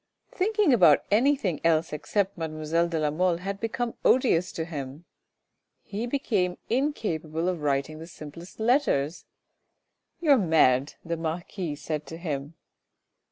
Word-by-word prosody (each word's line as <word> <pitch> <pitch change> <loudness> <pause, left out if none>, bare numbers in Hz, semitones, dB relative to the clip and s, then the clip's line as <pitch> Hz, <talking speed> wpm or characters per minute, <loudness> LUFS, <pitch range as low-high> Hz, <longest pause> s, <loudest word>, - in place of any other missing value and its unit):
Thinking 410 - +2
about 170 -10 +6
anything 235 - +2
else 165 -1 +2
except 195 +6 -1
mademoiselle 160 +1 -1
de 170 -1 -2
la 150 -1 +1
Mole 175 +2 +1
had 195 +3 -5
become 235 +1 -2
odious 205 -9 +3
to 160 - -3
him; 145 -1 -7 0.8
he 215 +4 -4
became 210 -9 0
incapable 175 - -1
of 180 -4 -1
writing 145 +2 -1
the 165 - -9
simplest 170 +3 -11
letters. 220 - +1 0.5
" - - -53
You 320 -4 +2
are 275 - +7
mad," 150 -6 +3
the 165 0 -2
marquis 165 0 -4
said 150 0 -4
to 165 - -7
him. 150 -2 -4
170 Hz, 140 wpm, -27 LUFS, 155-210 Hz, 0.8 s, are